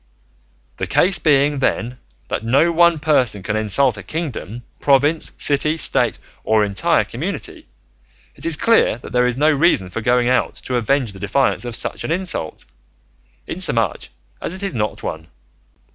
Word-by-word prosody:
The - - -3
case 185 +1 +3
being, 145 -1 +2
then, 125 -1 -1 0.3
that - - -3
no 140 +9 +3
one 170 0 +4
person 130 -10 +1
can 105 +2 -2
insult 110 +3 +1
a - - -7
kingdom, 120 - -5 0.2
province, 145 +3 +2
city, 150 +2 +1
state, - - +2 0.3
or 110 -1 +2
entire 100 -2 +1
community, - - -6 0.7
it - - -10
is 165 -2 0
clear 230 - +3
there 125 +1 0
is 125 0 -2
no 150 +3 +4
reason 140 - +2
for 115 - -4
going 120 +2 +2
out 125 0 +1
to 125 - -3
avenge 120 -1 0
the 95 - -12
defiance 125 +5 0
of 120 -2 -5
such - - -2
an - - -4
insult, 175 - -4 0.8
inasmuch - - -1 0.3
as 180 - -4
it 190 - -7
is 195 - -2
not 105 -3 -3
one. 80 0 -5
130 Hz, 160 wpm, -19 LUFS, 110-155 Hz, 0.8 s, one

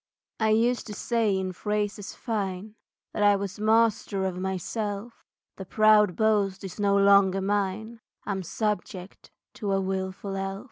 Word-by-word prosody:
I 220 -1 +2
used 235 +3 +2
to 210 - -7
say 225 -3 0
in 190 -1 -2
phrases 210 +1 -3
fine 205 -2 -4 0.4
That - - -3
I 205 0 +5
was 200 0 -5
master 215 -2 +2
of 185 -1 -3
myself, 205 +4 -4 0.3
The 190 - -7
proud 215 -3 +4
boast 205 -3 +1
is 190 +1 -8
no 200 -1 +3
longer 200 -1 +5
mine; 205 +3 -2 0.2
I'm 195 -2 -2
subject 195 -1 -4 0.2
to 205 -3 -3
a 195 - +2
wilful 190 +1 -3
elf. 195 0 -3
200 Hz, 145 wpm, -26 LUFS, 190-215 Hz, 0.4 s, I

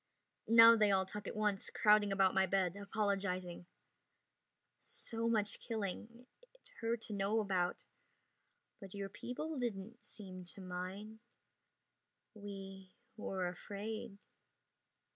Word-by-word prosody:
Now 230 0 +10
they 215 -2 +4
all 190 -1 +3
talk 210 +2 -6
at - - -5
once, 210 -2 0
crowding 210 -1 +4
about 195 -1 +4
my 190 0 +3
bed, 185 -1 +1
apologizing. 195 -4 -2 1.1
"So 230 0 -3
much 210 -3 +1
killing. 225 +2 -5 0.3
It - - -20
hurt 230 0 -1
to 220 - -6
know 200 +2 +1
about. 185 -4 0 0.9
But 195 -1 -10
your 200 -1 -4
people 290 - -5
didn't 230 -1 -4
seem 185 -3 -8
to - - -11
mind." 185 +4 -6 1.1
"We 195 -2 -9 0.2
were 190 -4 -2
afraid." 205 +4 -5
200 Hz, 115 wpm, -36 LUFS, 190-220 Hz, 1.1 s, Now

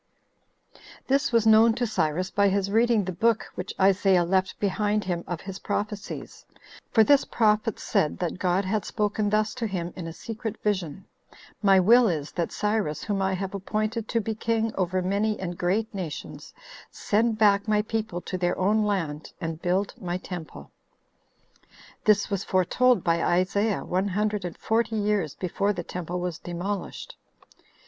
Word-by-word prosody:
2. - - -21 0.3
This 275 0 +2
was 230 -2 +3
known 220 +1 +6
to 245 0 0
Cyrus 180 -3 -1
by 200 0 +3
his 200 0 0
reading 225 0 +3
the 185 - -2
book 220 +5 +1
which 185 +2 -6
Isaiah 190 -1 +4
left 190 +2 0
behind 210 +1 0
him 175 -2 -2
of 175 -2 -4
his 195 0 -7
prophecies; 210 0 -5 0.5
for 220 - +5
this 280 +5 +5
prophet 215 -1 +1
said 150 - 0
that 180 0 -3
God 185 +2 +1
had 210 +2 0
spoken 210 -1 -1
thus 215 +1 +1
to 235 -3 -3
him 180 -3 -4
in 175 -3 -6
a - - -5
secret 225 +3 -6
vision: 190 -5 -2 0.6
"My 195 -2 +5
will 235 +6 +6
is, 155 -6 -2
that 170 -2 -2
Cyrus, 210 -8 -1
whom 205 -2 -1
I 190 0 +1
have 190 +1 -4
appointed 215 +3 -2
to 230 - 0
be 220 0 -2
king 225 0 -1
over 185 0 -1
many 205 +3 0
and 175 -2 -4
great 200 +7 -1
nations, 180 -6 -6 0.4
send 220 +1 0
back 205 -1 +4
my 210 -1 +2
people 220 -4 -3
to 185 - -5
their 175 0 0
own 210 +3 +2
land, 165 -7 -2
and 165 0 -4
build 185 +3 0
my 175 -1 -2
temple." 180 -3 -8 1.3
This 210 -2 +4
was 200 -2 -2
foretold 240 +7 +2
by 170 -2 +1
Isaiah 195 +4 +1
one 185 +3 0
hundred 210 0 -1
and 175 - -6
forty 225 0 0
years 205 -7 0
before 200 +3 -1
the 175 -3 -5
temple 180 +1 -5
was 175 -3 -4
demolished. 180 +4 -5
200 Hz, 170 wpm, -26 LUFS, 180-215 Hz, 1.3 s, known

